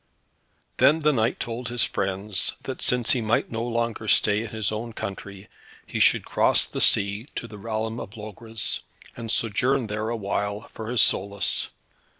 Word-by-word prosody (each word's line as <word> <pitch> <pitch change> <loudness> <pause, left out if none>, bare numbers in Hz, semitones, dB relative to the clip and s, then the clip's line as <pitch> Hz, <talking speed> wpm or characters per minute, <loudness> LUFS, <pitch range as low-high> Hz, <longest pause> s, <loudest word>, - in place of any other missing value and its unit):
Then 155 +3 +5
the 150 0 +4
knight 115 -2 +1
told 120 +1 -4
his 120 0 +2
friends 95 0 -1
that - - -6
since 125 +2 +3
he 130 -5 +3
might 110 +1 0
no 115 0 -2
longer 115 -2 -2
stay 105 +1 +3
in 115 - -5
his 110 -1 -2
own 115 +2 -4
country, 100 -1 -7 0.4
he - - -4
should - - +4
cross - - +3
the - - -4
sea 100 +5 +4
to 115 - -4
the 105 -3 -11
realm 110 +2 -3
of 100 - -8
Logres, 110 +1 -2 0.4
and 115 -1 -7
sojourn 125 +5 +1
there 105 +1 -3
awhile, 105 -1 -3
for 110 0 -6
his 120 -3 +4
solace. 100 +1 0
110 Hz, 165 wpm, -25 LUFS, 105-115 Hz, 0.4 s, Then